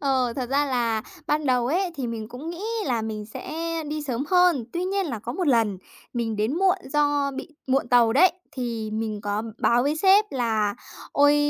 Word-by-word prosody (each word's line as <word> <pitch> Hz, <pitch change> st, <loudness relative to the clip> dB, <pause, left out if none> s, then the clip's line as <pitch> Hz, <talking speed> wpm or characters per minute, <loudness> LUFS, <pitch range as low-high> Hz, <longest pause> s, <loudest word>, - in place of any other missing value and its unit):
Ờ, 260 Hz, -4 st, +1 dB
thật 250 Hz, -2 st, -2 dB
ra 285 Hz, +2 st, +2 dB
là 235 Hz, -4 st, 0 dB, 0.2 s
ban 300 Hz, -1 st, 0 dB
đầu 250 Hz, -2 st, +2 dB
ấy 350 Hz, +6 st, +1 dB
thì 260 Hz, -3 st, -2 dB
mình 225 Hz, -2 st, -5 dB
cũng 260 Hz, +7 st, -7 dB
nghĩ 345 Hz, +3 st, -7 dB, 0.2 s
là 240 Hz, -5 st, 0 dB
mình 215 Hz, -1 st, -4 dB
sẽ 220 Hz, -, -8 dB, 0.4 s
đi 305 Hz, 0 st, -3 dB
sớm 265 Hz, -1 st, -2 dB
hơn. 360 Hz, -8 st, +4 dB
Tuy 350 Hz, +1 st, -1 dB
nhiên 390 Hz, -1 st, 0 dB
là 235 Hz, -7 st, -3 dB
có 235 Hz, +3 st, -5 dB
một 360 Hz, +4 st, -2 dB
lần 225 Hz, -7 st, +2 dB, 0.3 s
mình 230 Hz, -3 st, -2 dB
đến 215 Hz, +6 st, 0 dB
muộn 385 Hz, 0 st, +4 dB, 0.2 s
do 290 Hz, -1 st, +2 dB
bị 270 Hz, -, -7 dB, 0.2 s
muộn 265 Hz, -1 st, +1 dB
tàu 240 Hz, -2 st, +5 dB
đấy, 345 Hz, +7 st, +6 dB, 0.2 s
thì 230 Hz, -4 st, -3 dB
mình 215 Hz, -1 st, -3 dB
có 205 Hz, +1 st, -2 dB, 0.2 s
báo 240 Hz, +1 st, +3 dB
với 290 Hz, +3 st, 0 dB
sếp 390 Hz, +5 st, +5 dB
là 220 Hz, -5 st, 0 dB, 0.4 s
"Ôi, 290 Hz, +1 st, +5 dB
255 Hz, 205 wpm, -25 LUFS, 225-300 Hz, 0.4 s, đấy